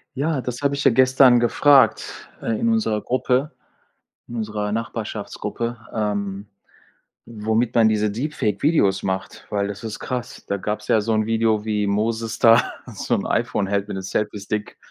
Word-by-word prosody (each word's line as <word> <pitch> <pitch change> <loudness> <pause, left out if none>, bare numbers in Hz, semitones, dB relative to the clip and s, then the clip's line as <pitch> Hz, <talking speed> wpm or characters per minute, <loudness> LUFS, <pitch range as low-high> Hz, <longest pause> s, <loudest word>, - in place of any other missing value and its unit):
Ja, 145 0 -1
das 125 +1 -5
habe 140 0 +1
ich 140 - -3
ja - - +5
gestern 130 0 +5
gefragt, 135 +3 +3
äh, - - -7
in 230 - +1
unserer 215 - +1
Gruppe 130 +3 0 0.8
in 120 - -7
unserer 105 -1 -3
Nachbarschaftsgruppe, 115 +1 -4 0.2
ähm, 100 -2 -2 0.8
womit 110 +1 -1
man 115 -2 +5
diese 105 -1 +1
Deep 150 +8 -4
Fake 105 -2 -1
Videos 140 - +2
macht, 95 0 -4
weil 100 -1 -1
das 100 +1 -7
ist 110 -3 -5
krass. 125 -2 -5
Da 100 - -1
gab's 105 +3 -4
ja 110 - +3
so 110 +2 -1
'n 110 0 +1
Video, 110 -1 +1
wie 105 -2 0
Moses 110 +2 -1
da 115 +1 +6 0.3
so - - -1
'n - - -3
iPhone - - 0
hält 100 +1 -1
mit 105 - -5
'nem 95 - -5
Selfiestick. 105 +1 -3
110 Hz, 170 wpm, -22 LUFS, 105-125 Hz, 0.8 s, da